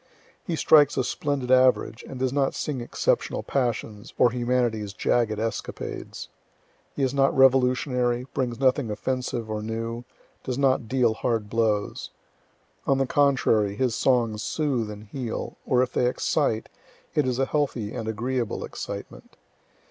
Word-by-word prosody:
He 170 - -2
strikes 150 -2 +5
a 130 - +2
splendid 135 -1 -2
average, 130 -2 +3
and 135 - -7
does 130 0 -1
not 140 -1 +1
sing 140 -5 -3
exceptional 120 - -1
passions, 115 -4 -2
or 120 - +5
humanity's 120 -4 0
jagged 110 -1 +1
escapades. 115 +1 -5 0.7
He 140 - -1
is 130 0 +1
not 135 -1 +2
revolutionary, 125 -1 +3
brings 120 -3 -2
nothing 130 -2 +2
offensive 120 +1 -2
or 110 -1 -3
new, 115 +2 -4 0.4
does 125 -1 -3
not 130 -4 +2
deal 125 -2 +2
hard 110 -2 -2
blows. 110 -3 0 0.8
On 135 - +3
the 135 - +2
contrary, 125 -7 +2
his 125 +1 0
songs 115 -4 +1
soothe 130 -8 -1
and 105 0 -8
heal, 115 +2 -5
or 125 0 +4
if 130 - -4
they 125 - +2
excite, 125 -2 0 0.5
it 150 -4 +2
is 125 -1 0
a 135 - +2
healthy 130 -8 -1
and 115 -3 -5
agreeable 120 +1 -2
excitement. - - -8
125 Hz, 145 wpm, -25 LUFS, 115-130 Hz, 0.8 s, strikes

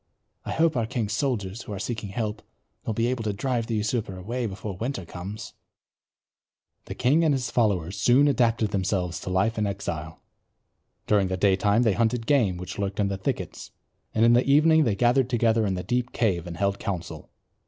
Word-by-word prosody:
"I - - -4
hope 160 -1 +2
our 115 -3 0
king's 115 -4 -2
soldiers, 110 -5 -2
who 105 - -7
are - - -4
seeking 105 +1 -4
help, 105 +1 -3 0.5
will 110 - 0
be 115 - +1
able 120 -1 -1
to 105 -2 -1
drive 120 +2 -1
the 115 - -1
usurper 105 -2 -2
away 115 +6 -3
before 100 0 -6
winter 115 -1 -4
comes." 95 +6 -7 1.3
The - - -7
king 140 +7 +3
and 150 -3 +3
his 130 -2 -3
followers 100 -6 0
soon 135 +4 +5
adapted 115 -6 +2
themselves 95 -3 -1
to - - -6
life 100 +5 +1
in 105 - +1
exile. 80 -5 -5 0.9
During 100 -2 +3
the 95 0 -2
daytime 100 +4 +3
they 110 -4 +3
hunted 115 +2 0
game 115 -10 +2
which 90 +2 -7
lurked 100 +1 -3
in 100 -1 +2
the 100 - -2
thickets; - - -4 0.5
in 115 +2 +5
the 120 +1 +5
evening 155 +2 +5
they 110 -4 +1
gathered 125 +3 +3
together 115 -2 +2
in 95 - -1
the 90 - -4
deep 125 0 -1
cave 95 -8 0
and 85 -1 -7
held 100 +1 0
council. 90 -4 -5
110 Hz, 190 wpm, -26 LUFS, 95-120 Hz, 1.3 s, soon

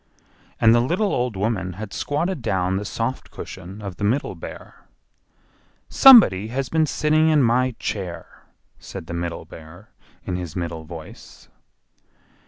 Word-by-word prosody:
And 110 0 +6
the 120 - +5
little 180 - 0
old 125 -3 -1
woman 95 -3 -2
had 105 +2 -8
squatted 165 +2 -2
down 95 -3 0
the 105 - -4
soft 115 +5 -4
cushion 95 +5 -9
of 95 -3 -7
the - - -6
Middle 120 +8 0
Bear. - - -11 1.0
"SOMEBODY 215 - +7
HAS 130 +3 -3
BEEN 160 -1 +2
SITTING 155 +1 +2
IN 150 -3 +4
MY 125 +1 +2
CHAIR!" 95 -5 -5 0.5
said - - -9
the 85 - -7
Middle 85 -1 -4
Bear, 80 +5 -14 0.3
in 90 - -3
his 85 -3 -6
middle 85 -3 -4
voice. 80 -1 -12
105 Hz, 145 wpm, -22 LUFS, 90-130 Hz, 1.0 s, SOMEBODY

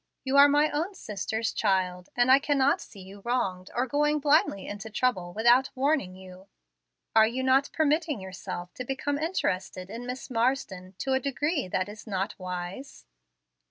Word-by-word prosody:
You 265 0 -1
are 285 +1 +9
my 295 +2 +3
own 335 +7 -2
sister's 220 - -3
child, 185 -3 0
and 245 +1 +4
I 270 - +8
cannot 280 -1 +2
see 200 - -12
you 195 +2 -12
wronged 190 -7 -1
or 245 - +1
going 295 +3 +1
blindly 290 - +2
into 205 +2 -7
trouble 205 -6 0
without 240 +6 +4
warning 270 -8 0
you. 185 0 -13 0.7
Are 220 -1 +7
you 255 +3 -3
not 265 +2 +3
permitting 310 -3 +1
yourself 185 -2 -7
to 250 - -6
become 275 +3 -2
interested 190 - -2
in 235 +2 -7
Miss 255 +1 -6
Marsden 225 -7 -1
to 270 - -1
a 265 - +3
degree 280 - -1
that 185 +1 -1
is 210 +2 -11
not 195 -1 -2
wise?" 180 +7 -6
240 Hz, 165 wpm, -27 LUFS, 190-275 Hz, 0.7 s, are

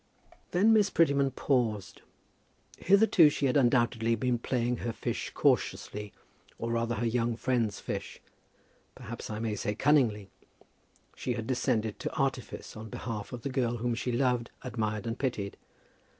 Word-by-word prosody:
Then 205 +6 +4
Miss 210 -2 +4
Prettyman 140 -6 +3
paused. 120 -7 -1 0.8
Hitherto 195 -4 +6
she 145 - -1
had 130 - +2
undoubtedly 120 -3 +3
been 120 +2 0
playing 120 0 0
her 120 - -3
fish - - -3
cautiously, 105 0 0 0.5
or 115 0 -3
rather 115 0 0
her 115 +3 -1
young 115 0 0
friend's 115 -4 0
fish, - - -5 0.8
perhaps 115 +3 -7
I 105 - -4
may 110 -1 -2
say 105 +1 -2
cunningly. 115 -9 +2 0.8
She 125 - -2
had 115 -2 -4
descended 115 -4 0
to - - -4
artifice - - -2
on 110 0 -8
behalf 105 -1 -5
of 120 -3 -7
the - - -2
girl 125 -3 0
whom 120 +1 -1
she 120 +2 -2
loved, 125 -1 +1
admired, 110 -1 -2
and 115 +1 -3
pitied. 110 -7 -2
120 Hz, 150 wpm, -30 LUFS, 110-130 Hz, 0.8 s, Hitherto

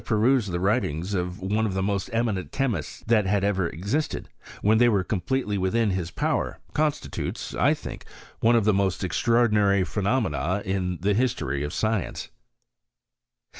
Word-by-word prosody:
perused 115 -1 +2
the 85 - -1
writings 95 -3 0
of 90 -1 -2
one 105 +4 0
of 95 - -3
the 95 - 0
most 100 -1 -1
eminent 115 -5 -1
chemists 115 - -2
that 110 -3 +3
had 100 0 +1
ever 95 -4 +1
existed, 105 - -2 0.4
when 110 +2 +4
they 120 0 +6
were 100 -4 +2
com 95 0 -2
pletely 115 -6 -1
within 105 +3 +1
his 90 -2 -2
power, - - -1 0.2
constitutes, 150 0 -2
I - - +3
think, - - -8 0.3
one 115 +1 +4
of 115 -3 +3
the 110 - +4
most 95 -2 0
extraordinary 105 -1 +3
phenomena 100 - 0
in 95 -2 -1
the 100 +3 +2
history 105 - 0
of 75 - -3
science. 110 -3 -2
100 Hz, 160 wpm, -25 LUFS, 95-115 Hz, 0.4 s, they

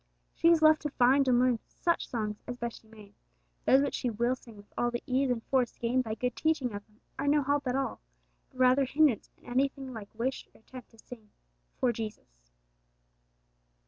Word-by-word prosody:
She - - +1
is 335 -2 +5
left 310 0 +6
to 295 - -2
find 270 +1 +3
and 250 -1 +4
learn 250 -2 +3
such 340 -1 -1
songs 210 -3 -3
as 245 - -5
best 235 -1 -5
she 220 - -25
may; 215 -2 -15 0.5
those 270 +2 +5
which 285 - -2
she 250 - -1
will 235 +3 0
sing 230 -4 -15
with 205 0 -17
all 240 - +1
the 240 0 -4
ease 265 +1 +1
and 235 -2 -1
force 255 -3 0
gained 245 +2 +1
by 220 -2 -4
good 250 +2 -2
teaching 300 -7 0
of 205 0 -6
them 215 +1 -29 0.2
are - - -1
no 290 0 +3
help 285 0 0
at 250 - 0
all, 270 -1 -2 0.5
but - - -21
rather 255 +2 +4
hindrance 280 -4 +2
in - - -25
anything 270 +1 -1
like 210 -3 -8
wish 255 +3 -2
or - - -19
attempt 255 +1 -12
to 225 - -22
'sing 220 -2 -13 0.5
for 250 - +2
Jesus.' - - -8
250 Hz, 210 wpm, -30 LUFS, 225-270 Hz, 0.5 s, left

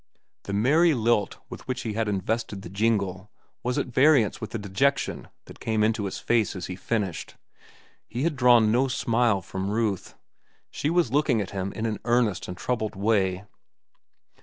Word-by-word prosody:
The 100 - -4
merry 150 +10 +4
lilt 115 -3 +1
with - - -10
which 130 -1 -2
he 110 - -3
had 110 +1 -1
invested 105 0 -2
the - - -8
jingle 100 -2 0 0.3
was 125 0 -2
at - - +1
variance 130 -2 +3
with 110 - -5
the 115 - -4
dejection 105 +8 0 0.2
that - - -13
came 110 -1 0
into 110 -1 +1
his 95 - -4
face 115 -4 +1
as 90 - -5
he 90 - -5
finished. 95 -2 -3 0.7
He 120 +4 -3
had 165 -2 0
drawn 120 -4 +5
no 125 +4 +3
smile 115 -5 +1
from 95 +2 -4
Ruth. 105 -3 -1 0.6
She 145 - -2
was 165 -7 +1
looking 140 -5 +2
at 100 -2 -3
him 95 -1 -3
in 110 - -3
an 110 -2 -2
earnest 120 -4 +1
and 90 - -6
troubled 110 -2 -2
way. 95 -2 +1
110 Hz, 175 wpm, -26 LUFS, 100-125 Hz, 0.7 s, drawn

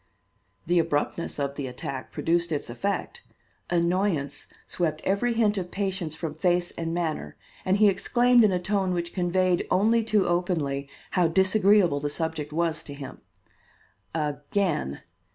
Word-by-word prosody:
The 175 +1 +3
abruptness 160 +1 -1
of 140 -1 -1
the 140 -1 -4
attack 130 +1 -6
produced 170 0 0
its 145 -5 -3
effect. 200 - -3 0.5
Annoyance 170 -4 0 0.2
swept 155 -3 -1
every 200 +5 +1
hint 215 -3 +2
of 180 -1 -5
patience 190 -5 -3
from 160 -2 -4
face 175 +2 +1
and 165 -1 -4
manner, 160 - -3 0.3
and 185 +1 +3
he 210 0 +6
exclaimed 240 +5 +4
in 210 - +4
a 180 - +1
tone 190 +1 0
which 170 -1 -3
conveyed, 180 0 +1
only 225 +4 +3
too 215 -3 +2
openly, 160 -6 -1 0.2
how 180 -3 +3
disagreeable 190 -2 +4
the 145 +1 -2
subject 155 -1 -3
was 165 0 0
to 145 - -8
him. 140 -2 -9 0.9
"Again!" 150 - -1
175 Hz, 145 wpm, -26 LUFS, 150-195 Hz, 0.9 s, he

